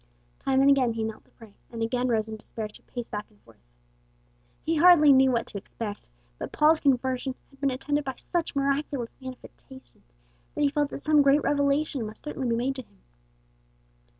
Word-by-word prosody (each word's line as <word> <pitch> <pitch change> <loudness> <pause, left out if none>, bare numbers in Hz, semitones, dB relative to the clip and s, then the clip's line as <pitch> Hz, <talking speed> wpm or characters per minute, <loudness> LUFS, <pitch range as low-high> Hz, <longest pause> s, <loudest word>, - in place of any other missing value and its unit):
Time 270 0 +2
and 275 - +5
again 255 -4 +3
he 225 0 -3
knelt 220 -1 -5
to - - -28
pray, 220 -3 -16 0.2
and 230 -1 -3
again 245 +2 0
rose 220 -3 +1
in 220 - -6
despair 215 0 -6
to 210 - -13
pace 240 -2 -7
back 210 0 -6
and 105 - -27
forth. 115 -1 -21 1.1
He 325 0 +1
hardly 305 -3 +7
knew 265 0 +5
what 235 -2 0
to 200 - -7
expect, 205 +1 -7 0.3
but - - -5
Paul's 310 +1 +4
conversion 260 -1 0 0.2
had 275 0 -22
been 280 - +2
attended 290 +3 -1
by 265 -1 -4
such 340 -3 -3
miraculous 275 -3 -1
manifestations 260 - -13 0.4
that - - -2
he 285 - +4
felt 290 -1 0
that - - -6
some 305 0 +3
great 280 +1 +4
revelation 285 -1 +1
must 215 +6 -11
certainly 270 -4 -3
be 230 - +2
made 265 +3 -1
to - - -4
him. 225 - -25
265 Hz, 195 wpm, -27 LUFS, 230-285 Hz, 1.1 s, hardly